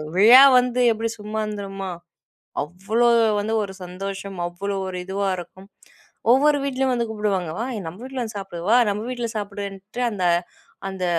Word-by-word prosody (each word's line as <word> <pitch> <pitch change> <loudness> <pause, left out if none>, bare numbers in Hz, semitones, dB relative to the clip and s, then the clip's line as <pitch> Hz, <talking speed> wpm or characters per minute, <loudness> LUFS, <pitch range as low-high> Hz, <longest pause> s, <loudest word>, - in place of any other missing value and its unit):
விழா 235 +8 +9 0.2
வந்து 250 0 0
எப்பிடி 225 +1 -3
சும்மா 215 +1 -3
இருந்துருமா? 195 -2 -5 0.7
அவ்ளோ 195 +9 0 0.3
வந்து 215 +2 -2
ஒரு 200 -2 -5
சந்தோஷம்! 195 +1 -6
அவ்ளோ 195 +3 -4
ஒரு 185 - -5
இதுவா 195 +1 -2
இருக்கும். 190 +2 -11 0.6
ஒவ்வொரு 290 +3 +4
வீட்லயும் 265 -1 0
வந்து 235 -1 -1
கூப்பிடுவாங்க. 200 -6 -1
வா! 230 - -1 0.2
நம்ம 170 +4 -10
வீட்ல 265 0 -5
வந்து 220 -3 -6
சாப்பிடு 195 -3 -7
வா! 235 - +6
நம்ம 205 +1 -3
வீட்ல 240 -2 -3
சாப்பிடுன்ட்டு, 200 +1 -6
அந்த, 195 -4 -3 0.7
அந்த 190 -1 -4
205 Hz, 150 wpm, -23 LUFS, 195-230 Hz, 0.7 s, விழா